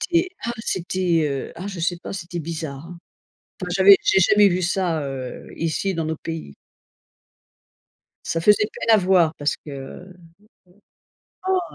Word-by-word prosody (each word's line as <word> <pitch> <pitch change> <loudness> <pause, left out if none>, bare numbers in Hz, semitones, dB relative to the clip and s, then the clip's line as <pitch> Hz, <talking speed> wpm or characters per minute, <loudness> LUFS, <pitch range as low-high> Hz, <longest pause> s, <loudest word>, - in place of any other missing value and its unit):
c'était 345 0 +1 0.2
ah 235 - -1
c'était, 180 -4 0
heu, 140 -1 -4
ah 180 +4 -6
je 195 -4 -6
sais 175 +1 -1
pas, - - -8
c'était 175 -2 -5
bizarre, 160 -2 -6
hein. 175 0 -10 0.6
Enfin 180 - -4
j'avais 195 +1 +8
j'ai - - +3
jamais 205 +2 +6
vu 180 0 -1
ça, 175 -3 0
heu, 135 -2 -6
ici 165 +4 -1
dans 165 -1 -2
nos 160 0 -2
pays. 160 - -7 1.7
Ça 165 - -1
faisait 210 +3 +5
peine - - -5
à 220 - +8
voir 180 -4 +3
parce 145 0 0
que, - - -14
mmh, 140 +7 -9 1.3
heu, 375 -1 +3
175 Hz, 160 wpm, -22 LUFS, 160-190 Hz, 1.7 s, j'avais